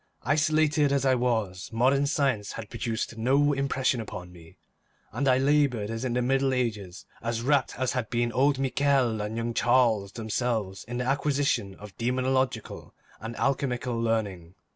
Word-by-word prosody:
Isolated 150 0 +2
as 140 -1 +1
I 130 - +4
was, 110 -7 -1
modern 135 +5 +2
science 135 -9 0
had 110 -2 -8
produced 115 -1 -3
no 140 +5 +3
impression 135 -3 0
upon 90 -4 -8
me, 85 -2 -16 0.5
and 135 +6 -1
I 130 -1 +5
laboured 135 -6 +2
as 115 +2 -4
in 125 -2 -1
the 125 0 +1
Middle 135 +1 +1
Ages, 105 -7 -3 0.2
as 115 0 -2
wrapt 140 0 +1
as 130 0 0
had 125 -4 -3
been 120 -1 0
old 140 +3 +2
Michel 135 -4 +1
and 105 +2 -4
young 115 0 -2
Charles 115 -5 +2
themselves 110 -3 -2
in 120 +1 -5
the 125 - -2
acquisition 140 -7 0
of 105 -1 -12
demonological 130 -1 -1 0.3
and 115 +2 -6
alchemical 125 -2 -1
learning. 105 -7 -2
125 Hz, 160 wpm, -27 LUFS, 110-135 Hz, 0.5 s, I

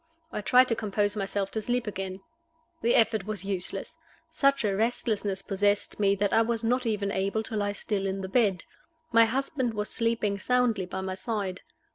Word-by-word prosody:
I - - -3
tried 250 +5 +5
to 230 - +2
compose 205 -1 0
myself 195 -1 -2
to 220 - -2
sleep 245 +2 0
again. 190 -2 -5 0.6
The 235 - +3
effort 220 -3 +3
was 210 -2 -3
useless. 190 -2 -3 0.3
Such 275 -1 +2
a 200 -2 +1
restlessness 210 -3 -1
possessed 205 +1 0
me 200 -1 +3
that 200 0 0
I 225 - +5
was 230 0 -1
not 245 +2 +1
even 205 -2 0
able 200 +3 0
to 220 - -4
lie 205 -1 0
still 200 -1 -2
in 195 0 -2
the 190 - -4
bed. 195 -5 +2 0.5
My 230 -1 +7
husband 260 0 -1
was 210 0 -2
sleeping 230 -3 0
soundly 240 -4 +1
by 190 +1 -4
my 190 0 -3
side. 190 -1 -3
210 Hz, 185 wpm, -28 LUFS, 195-230 Hz, 0.6 s, My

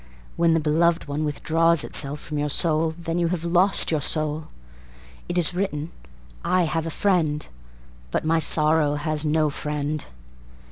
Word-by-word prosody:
When 165 -1 +3
the - - +3
beloved 165 +2 +1
one 145 +2 -2
withdraws 165 +2 +1
itself 145 +1 -2
from 150 0 -5
your 150 0 -1
soul 160 +1 +1
Then 170 0 -3
you 170 - +2
have 170 -1 -2
lost 180 +3 +3
your 155 -2 +1
soul. 155 +1 0 0.8
It 175 - -2
is 175 0 +3
written: 170 -4 -3 0.5
"l 185 -1 +2
have 165 0 -2
a - - -2
friend, 160 -5 0 0.6
But - - -2
my 165 +1 +2
sorrow 155 -1 +3
has 150 +1 -1
no 155 0 +2
friend." 150 +1 -3
155 Hz, 155 wpm, -24 LUFS, 150-170 Hz, 0.8 s, When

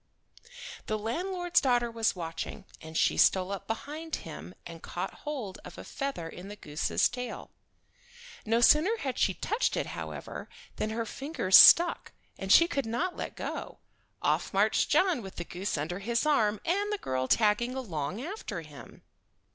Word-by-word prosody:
The 215 - 0
landlord's 350 - 0
daughter 245 -3 +2
was 225 -2 0
watching, 170 +3 -6 0.2
and 160 0 -6
she - - +2
stole 185 0 +4
up 200 - -5
behind 300 +8 -4
him 80 +5 -9
and 165 -1 -9
caught 180 +2 -5 0.2
hold 235 -11 -5
of - - -11
a - - -8
feather 275 - -4
in 180 +3 -9
the 205 - -8
goose's 150 -5 0
tail. 250 0 -7 0.9
No 225 +2 +1
sooner 320 - +5
had 265 -3 -3
she 190 - +2
touched 435 - -1
it, - - 0
however, - - -7 0.3
than 215 - -1
her 225 +1 -2
fingers 270 - 0
stuck, 345 0 +8 0.3
and 195 0 -3
she 335 - +8
could 275 -8 -2
not 345 +11 -2
let - - -6
go. - - -6 0.5
Off - - +1
marched - - +2
John 365 -8 +3
with 190 -2 -9
the 175 - -4
goose 185 +1 -3
under 165 +6 -3
his 235 +6 -1
arm, 215 -9 +2
and 400 +4 0
the 420 - 0
girl 130 - -2
tagging 230 - +2
along 190 - -4
after 320 - -5
him. 150 -3 -13
225 Hz, 165 wpm, -29 LUFS, 185-295 Hz, 0.9 s, stuck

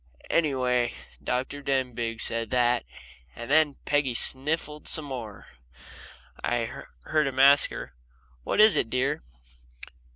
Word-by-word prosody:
Anyway, 125 -6 +1 0.3
Dr. 130 +3 -3
Denbigh 125 -4 -2
said 115 -1 0
that, 125 -1 +1 0.5
and 120 - -7
then 150 -2 +3
Peggy 145 -4 0
sniffled 150 +4 +1
some 155 - +1
more, 120 -7 -8 0.9
and 120 - 0
I 115 -1 -4 0.2
heard 155 - 0
him 130 -1 -4
ask 140 +1 +6
her: - - -8 0.5
"What - - -2
is 215 -1 +7
it, 115 - 0
dear?" 130 - -1
130 Hz, 125 wpm, -26 LUFS, 120-145 Hz, 0.9 s, is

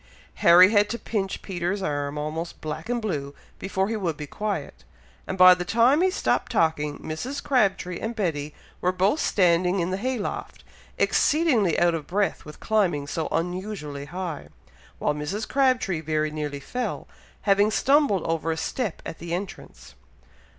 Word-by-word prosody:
Harry 180 +3 +8
had 205 -1 +4
to 235 - -2
pinch 200 -5 -3
Peter's 185 +1 -2
arm 145 -3 -2
almost 155 +3 -4
black 155 +5 -6
and 240 -2 -1
blue 145 -8 -3 0.2
before 195 0 -1
he 225 - -2
would 175 -8 -2
be 150 - -5
quiet; 195 -1 -4 0.4
and 190 - -4
by 185 0 +9
the 180 0 -3
time 235 - +3
he 375 - +4
stopped 370 - 0
talking, 150 -3 +1
Mrs. 250 - -5
Crabtree 195 -10 +1
and 225 +1 -4
Betty 155 -8 -2 0.3
were 180 - +2
both 190 +10 +1
standing 180 - +2
in 175 +1 -1
the 190 - -1
hay 255 +5 -2
loft, 205 - -5 0.3
exceedingly 265 - +2
out 175 0 +3
of 160 -3 -4
breath 200 +2 -1
with 150 0 -11
climbing 185 -10 +1
so 160 +2 -3
unusually 175 -4 -3
high, 170 -1 -5 0.5
while 150 - 0
Mrs. 150 +9 -4
Crabtree 255 - +1
very 155 -1 -1
nearly 150 -2 -4
fell, 245 - -4 0.4
having 200 +1 +4
stumbled 270 - +3
over 165 0 -1
a 160 - -2
step 210 +4 -3
at 165 - -7
the 170 +1 -3
entrance. 190 +1 -8
180 Hz, 165 wpm, -25 LUFS, 155-210 Hz, 0.5 s, by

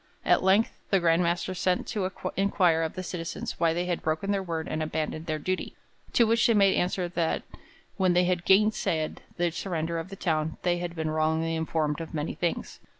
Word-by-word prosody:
At - - +4
length 195 +4 +4 0.2
the 195 - +4
Grand 165 0 +3
Master 175 +2 0
sent 185 0 0
to 190 -3 -1 0.3
inquire 185 -4 +3
of 160 -1 -2
the 185 - -4
citizens 170 -2 -5
why 165 -1 +3
they 175 +2 -1
had 175 -1 -2
broken 160 +6 -1
their 200 -1 +1
word 165 -3 -3
and 155 - -2
abandoned 155 +1 -3
their 155 -1 -1
duty, 185 +5 -3 0.4
to 240 - +5
which 230 0 +3
they 230 - +4
made 195 -2 +5
answer 180 0 0
that 170 -2 -1 0.5
'when 185 -2 +3
they 180 +1 +4
had 180 -1 0
gainsaid 190 -6 +2 0.2
the 175 -1 +1
surrender 165 -1 -2
of 165 +3 -6
the 195 - -7
town, 160 -4 -1
they 175 -1 +1
had 175 -1 -4
been 160 -1 -2
wrongly 160 +1 +1
informed 160 -1 -1
of 160 - -7
many 150 +1 -2
things. 175 - -3
175 Hz, 205 wpm, -27 LUFS, 160-185 Hz, 0.5 s, to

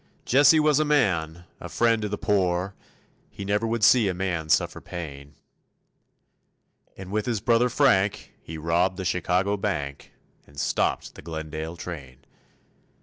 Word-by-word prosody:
Jesse 145 +4 +5
was 150 -1 +3
a - - +3
man, 85 - 0 0.2
a - - -8
friend 115 -1 +2
to 105 - -3
the 105 - -3
poor, 95 -2 0 0.6
He 100 - -8
never 105 +3 0
would 115 -1 -2
see 115 0 +6
a 90 - -3
man 85 -4 -3
suffer - - +1
pain; 70 -4 -8 1.6
And 95 0 -9
with 105 +2 -2
his 115 -4 0
brother 120 +3 +2
Frank 105 -7 +1
he 80 - -8
robbed 85 +4 0
the 95 - -5
Chicago 90 +3 0
bank, 75 -9 -4 0.4
And 70 0 -11
stopped 70 - -1
the - - -12
Glendale 80 +1 -6
train. 70 -7 -9
95 Hz, 145 wpm, -25 LUFS, 80-110 Hz, 1.6 s, see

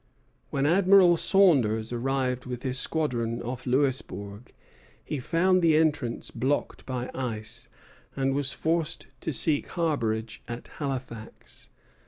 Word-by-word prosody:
When 140 0 0
Admiral 185 +1 +6
Saunders 125 - +3
arrived 125 0 -1
with 125 -1 -5
his 130 -1 -1
squadron 120 -8 -1
off 125 +2 -5
Louisbourg, 125 -5 -1 0.5
he 150 - -3
found 180 +7 +2
the 160 -2 +4
entrance 145 -7 0
blocked 130 +5 -2
by 125 -1 -3
ice, 110 -5 -4 0.5
and 135 0 +1
was 140 -1 0
forced 165 0 -1
to - - -3
seek 145 +2 +1
harborage 115 -10 -1
at 120 0 -7
Halifax. 130 -6 -6
135 Hz, 120 wpm, -27 LUFS, 120-155 Hz, 0.5 s, Admiral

